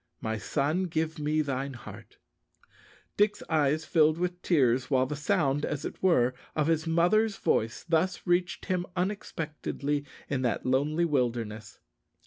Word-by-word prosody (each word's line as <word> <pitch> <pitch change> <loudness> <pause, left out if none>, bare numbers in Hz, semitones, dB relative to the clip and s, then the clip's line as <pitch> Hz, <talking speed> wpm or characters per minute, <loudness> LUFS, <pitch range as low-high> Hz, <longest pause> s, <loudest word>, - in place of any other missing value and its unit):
My 110 -1 -3
son, 155 - 0
give 160 -1 -2
me 155 +1 +1
thine 135 -1 -3
heart_." 120 - -11 1.0
Dick's 205 0 +2
eyes 155 0 +2
filled 155 -2 +3
with 180 0 -2
tears 130 -6 +2
while 130 -2 +3
the 150 - -4
sound, 145 -3 +1
as 145 -2 -2
it - - -6
were, 130 -10 +3 0.2
of 150 - +2
his 160 +1 +1
mother's 195 +6 +3
voice 110 0 0
thus 175 +2 +1
reached 175 0 0
him 180 -1 -1
unexpectedly 155 -6 -2 0.2
in 140 -2 -1
that 125 -2 -1
lonely 145 +6 +2
wilderness. 115 -7 -2
150 Hz, 140 wpm, -29 LUFS, 135-175 Hz, 1.0 s, filled